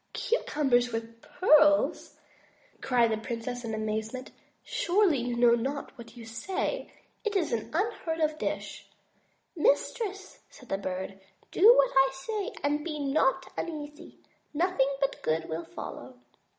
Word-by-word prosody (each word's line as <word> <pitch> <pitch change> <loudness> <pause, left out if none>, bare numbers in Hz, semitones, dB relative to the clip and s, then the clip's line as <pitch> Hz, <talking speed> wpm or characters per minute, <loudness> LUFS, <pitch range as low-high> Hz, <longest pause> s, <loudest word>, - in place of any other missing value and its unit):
"Cucumbers 265 - +1
with 230 0 -6
pearls!" 300 -4 +3 0.6
cried 240 -3 +3
the 220 - -1
princess 240 +2 -5
in 225 -1 -3
amazement. 220 +4 -4 0.3
"Surely, 355 -5 +2
you 240 0 -2
know 235 0 +5
not 270 +5 -2
what 235 -1 -12
you 230 - -9
say. 375 - -3 0.3
It 430 -2 -2
is 350 -9 +1
an 220 -2 -2
unheard 335 -3 -1
of 310 -1 0
dish." - - -4 0.7
"Mistress," 390 - 0
said 255 - -16
the 195 - -1
Bird, 190 0 -5 0.3
"do 420 +6 +8
what - - +4
I 270 0 +5
say, 400 +9 -4
and 295 +1 0
be 310 -2 -4
not 270 -2 +1
un 340 - -3
easy. 295 -1 -9 0.4
Nothing 330 -4 +2
but 275 0 -1
good 160 +1 -1
will 165 +1 -4
follow." 130 -6 -8
270 Hz, 140 wpm, -29 LUFS, 230-325 Hz, 0.7 s, do